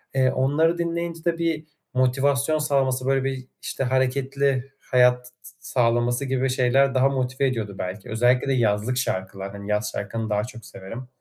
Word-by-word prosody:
Eee, 130 -1 +3
onları 155 +6 +2
dinleyince 170 -1 -3
de 170 -1 +1
bir 165 -2 -1 0.3
motivasyon 135 +4 +2
sağlaması, 135 -3 +1
böyle, 135 0 +2
bir, 130 -1 -3
işte, 135 - -3
hareketli 135 +1 0
hayat 125 -1 +3
s - - -16
s - - -14 0.2
sağlaması 120 +1 +2
gibi 130 0 0
şeyler 130 +2 +3
daha 130 +1 +4
motive 130 0 0
ediyordu 110 -6 -3
belki. 95 +2 -5
Özellikle 120 +4 +2
de 135 - +2
yazlık 115 +1 +1
şarkılar, 95 -5 -3
hani, 100 0 -8
yaz 105 0 0
şarkılarını 110 +2 -4
daha 105 0 +1
çok 115 -2 -9
severim. 115 +7 -9
130 Hz, 165 wpm, -24 LUFS, 115-135 Hz, 0.3 s, daha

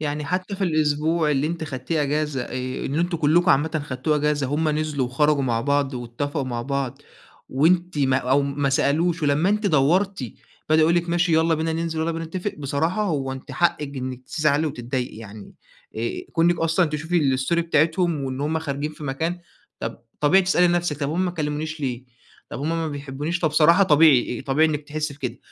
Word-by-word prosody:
يعني 150 0 -3
حتى 185 +5 -3
في 195 - -1
الأسبوع 155 0 +1
اللي 145 +1 +1
أنتِ 165 0 -3
خدتيه 145 +2 -2
إجازة 145 -2 -1
آآ 130 +1 -4
إن 135 - -3
أنتم 175 +1 0
كلكم 170 +3 +3
عامةً 150 +2 +1
خدتوه 140 +3 -1
إجازة 150 -2 0
هُم 155 +3 0
نزلوا 150 -4 -1
وخرجوا 145 +2 +2
مع 120 -3 0
بعض 140 +1 0
واتفقوا 135 +4 -3
مع 120 -2 -3
بعض 140 -2 -3 0.5
وأنتِ 170 +4 +2
ما 135 -2 +3
أو 135 +2 +2
ما 140 0 -1
سألوش 165 +5 +1
ولمّا 150 +4 +2
أنتِ 210 +1 +1
دوّرتِ 175 +2 +2 0.5
بدأو 155 - +5
يقولوا 170 +2 +4
لِك 170 - -12
ماشي 175 0 +1
يالّا 160 +1 +3
بينا 160 +1 -1
ننزل، 165 0 -2
ويالّا 165 +1 0
بينا 165 0 -4
نتفق، 180 +5 -4
بصراحة 155 +8 -1
هو 140 -8 -1
أنتِ 130 0 -9
حقِك 150 -5 0
إنك 130 -1 -5
تزعلي 150 +2 +1
وتتضايقي 125 -3 -4
يعني 110 -1 -11 0.4
آآ - - -1 0.2
كون 165 +1 +3
إنِك 175 - 0
أصلًا 165 +2 +2
تشوفي 150 -2 0
الstory 135 +6 0
بتاعتهم، 165 -1 +1
وإن 130 0 -4
هُم 155 +2 0
خارجين 150 -1 -3
في 150 0 -10
مكان 160 +6 -2 0.4
طَب - - -4 0.2
طبيعي 180 +6 +5
تسألي 180 -1 +3
نفسِك 175 -4 0
طَب 140 0 -1
هُم 175 +4 0
ما 180 - 0
كلمونيش 155 -1 -3
ليه؟ 125 -3 -3 0.5
طَب - - -6
هُم 150 - -2
ما 165 -1 -1
بيحبونيش 145 +3 -4
فبصراحة 165 +3 +4
طبيعي 150 -8 +4
طبيعي 155 +4 +2
إنِك 150 -1 -2
تحسي 150 -1 -3
بكده، 130 -4 -5
150 Hz, 190 wpm, -23 LUFS, 140-165 Hz, 0.5 s, بدأو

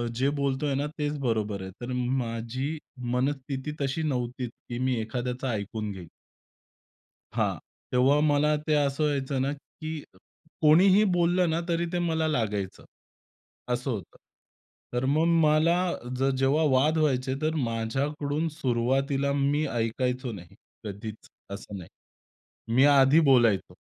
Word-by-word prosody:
जे 130 +4 +2
बोलतोय 140 +1 0
ना 140 +2 0
तेच 150 -1 -1
बरोबर 110 -6 -1
आहे. 95 0 -7
तर 120 +1 -5
माझी 125 +3 -2 0.3
मनस्थिती 135 +2 -2
तशी 140 +3 -1
नव्हती, 125 -3 -2
की 120 +1 -9
मी 130 0 +1
एखाद्याचं 125 +3 -3
ऐकून 105 -2 -3
घेईल. 95 -3 -9 1.3
हां, - - +1 0.3
तेव्हा 130 +4 +4
मला 150 0 +3
ते 155 - +3
असं 145 0 +1
व्हायचं 140 -2 0
ना, 135 +2 0
की 155 +1 -8 0.6
कोणीही 185 +6 +6
बोललं 175 0 +2
ना, 160 +1 +1
तरी 170 0 +1
ते 175 - 0
मला 160 -2 0
लागायचं 105 -9 -2 0.9
असं 125 +2 -2
होतं. 105 -7 -6 0.8
तर 125 +1 0
मग 160 +1 +3 0.2
मला 155 +3 +4 0.4
जर 135 +1 +3
जेव्हा 135 +4 +2
वाद 145 +5 +3
व्हायचे, 130 -4 +1
तर 155 +1 0
माझ्याकडून 145 +7 -1
सुरुवातीला 135 +1 0
मी 145 +2 +1
ऐकायचो 125 +1 -1
नाही, 90 -5 -11 0.3
कधीच 105 +1 -7 0.2
असं 100 0 -7
नाही. 90 - -10 0.9
मी 130 +2 +6
आधी 140 +1 +6
बोलायचो 115 -7 +3
135 Hz, 130 wpm, -27 LUFS, 120-150 Hz, 1.3 s, कोणीही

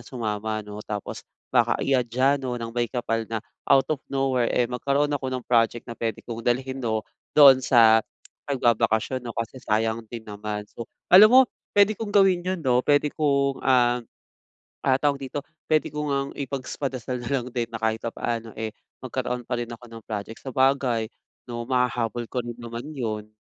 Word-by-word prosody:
sumama 110 -3 -3
'no? 105 0 -8
Tapos 105 -1 -5 0.3
baka - - +3
iadya 130 +1 +2
'no 125 -2 -3
ng 115 -1 -6
Maykapal 115 -1 -2
na 115 - -2 0.3
out 135 - +6
of 145 - -4
nowhere, 135 -3 +1
eh, 125 - +2
magkaroon 140 +4 0
ako 140 -2 -2
ng 130 -1 -4
project 120 -1 +2
na - - -7
pwede 115 -2 -4
kong 115 -1 -6
dalhin 130 +3 -1
'no, 110 -3 -1 0.3
doon 140 -3 +9
sa 115 -3 +6 0.5
pagbabakasyon 120 -1 +1
'no, 120 -2 -8
kasi 115 +3 -4
sayang 110 0 0
din 115 -1 -8
naman. 105 0 -5
So, 115 - -8 0.2
alam 200 +4 +10
mo, 255 +3 +8 0.4
pwede 205 +1 +6
kong 220 +1 -5
gawin 195 -3 +4
'yon 185 -1 -2
'no, 125 -1 +3
pwede 145 +2 +2
kong, 140 -3 +1
ah, 125 -2 +3 0.8
ah, 130 -1 +4
tawag 140 -1 +1
dito? 135 +1 -5 0.2
Pwede 155 -1 +1
ko 150 0 -4
ngang 140 0 -2
ipagpadasal 130 -2 -4
nalang 125 0 -1
din 120 -1 -2
na 115 - -5
kahit 110 0 +1
papaano, 115 -1 -3
eh, 110 +1 -4 0.3
magkaroon 125 -1 -4
pa - - -1
rin 120 0 -4
ako 120 +1 -11
ng 115 0 -11
project. 110 +1 -5
Sabagay 130 -3 +1 0.4
'no, 120 -1 -4
mahahabol 120 -2 -1
ko 125 +1 -3
rin 120 0 -7
naman 115 0 -6
'yon. 110 -6 -4
125 Hz, 170 wpm, -25 LUFS, 115-135 Hz, 0.8 s, alam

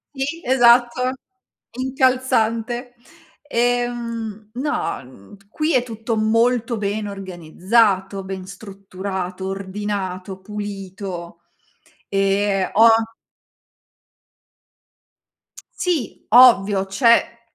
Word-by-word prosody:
Ti 290 +5 -3
esatto, 245 0 +4 0.7
incalzante. 250 -2 0 0.5
Ehm, 235 -4 -2
no, 295 +4 -2
mhmm, 125 - -16
qui 310 +6 -1
è 255 -2 +3
tutto 225 -1 -4
molto 230 +2 +1
ben 205 +1 -2
organizzato, 195 +2 0
ben 190 -1 -6
strutturato, 190 -1 -6
ordinato, 190 -1 -5
pulito. 190 -4 -7 0.7
Ehm 195 0 +1
ho 225 +2 +7 2.9
Sì, 340 - -3
ovvio, 210 -5 +6
c'è 235 +3 +2
215 Hz, 70 wpm, -21 LUFS, 195-240 Hz, 2.9 s, ho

